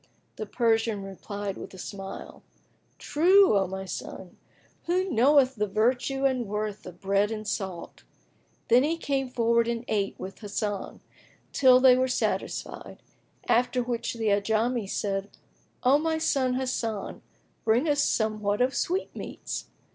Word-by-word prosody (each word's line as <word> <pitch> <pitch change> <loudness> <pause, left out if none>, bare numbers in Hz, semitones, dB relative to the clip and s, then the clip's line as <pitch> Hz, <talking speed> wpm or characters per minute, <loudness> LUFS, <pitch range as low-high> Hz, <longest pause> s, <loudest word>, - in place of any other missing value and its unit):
The 215 - -5
Persian 225 -2 +1
replied 195 +1 -6
with - - -9
a - - -11
smile, 195 +1 -8 0.6
"True, 370 - +4
O 195 -2 +2
my 190 +1 -5
son! 185 -1 -7 0.5
Who 365 +2 +1
knoweth 265 +1 +4
the 210 0 0
virtue 250 +6 +1
and 255 -4 +1
worth 210 0 -4
of 180 -1 -11
bread 200 +1 +1
and 215 -1 -5
salt?"[FN#18] 190 -5 -8
Then 240 +2 +6
he 325 +3 0
came 270 -4 -1
forward 235 -1 +2
and 235 0 -2
ate 200 -2 -1
with 190 +1 -8
Hasan, 205 -1 -4 0.5
till 255 -2 +6
they 255 -1 +7
were 255 +1 +2
satisfied; 250 - -3 0.4
after 245 +1 +2
which 240 -1 -3
the 225 -2 0
Ajami 220 +2 +1
said, 195 -1 -2 0.5
"O 265 +3 +5
my 320 +1 0
son 270 -5 +1
Hasan, 235 -5 -3 0.4
bring 235 +7 +2
us 290 -1 +2
somewhat 215 -2 0
of 255 +2 +2
sweetmeats." 370 +3 -3
230 Hz, 140 wpm, -27 LUFS, 205-260 Hz, 0.6 s, they